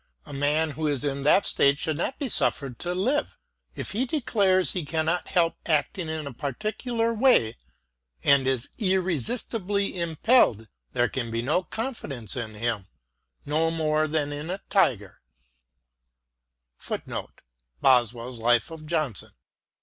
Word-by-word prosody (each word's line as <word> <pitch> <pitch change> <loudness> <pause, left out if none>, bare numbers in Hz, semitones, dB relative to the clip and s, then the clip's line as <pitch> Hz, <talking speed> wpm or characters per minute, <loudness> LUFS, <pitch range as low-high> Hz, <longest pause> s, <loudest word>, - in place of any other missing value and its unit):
A - - -10
man 150 +3 +1
who 155 +1 -2
is 145 -4 0
in 140 -1 -2
that 150 +8 +4
state 140 0 +4
should 155 0 -1
not 250 +10 -2
be 290 - -2
su£Fered 135 - 0
to 175 0 -3
live: 260 +11 0 0.4
if - - -4
he 245 +6 -1
declares 200 - +2
he 180 - -3
cannot 160 +3 -1
help 170 -2 +2
acting 160 +2 0
in 160 -1 -3
a 140 - -6
particular 220 - -2
way 225 - +3 0.7
and 140 -2 +4
is 130 -2 0
irresistibly 190 - 0
impelled, 165 - +3 0.3
there 120 - +2
can 120 +1 -4
be 115 +1 -2
no 150 +8 +2
confidence 180 - -4
in 115 -4 -5
him, 110 -3 -2 0.6
no 155 +3 +1
more 155 -1 +1
than 150 -2 -1
in 145 +3 -5
a 185 - -2
tiger." 110 - +1
160 Hz, 125 wpm, -26 LUFS, 140-195 Hz, 0.7 s, that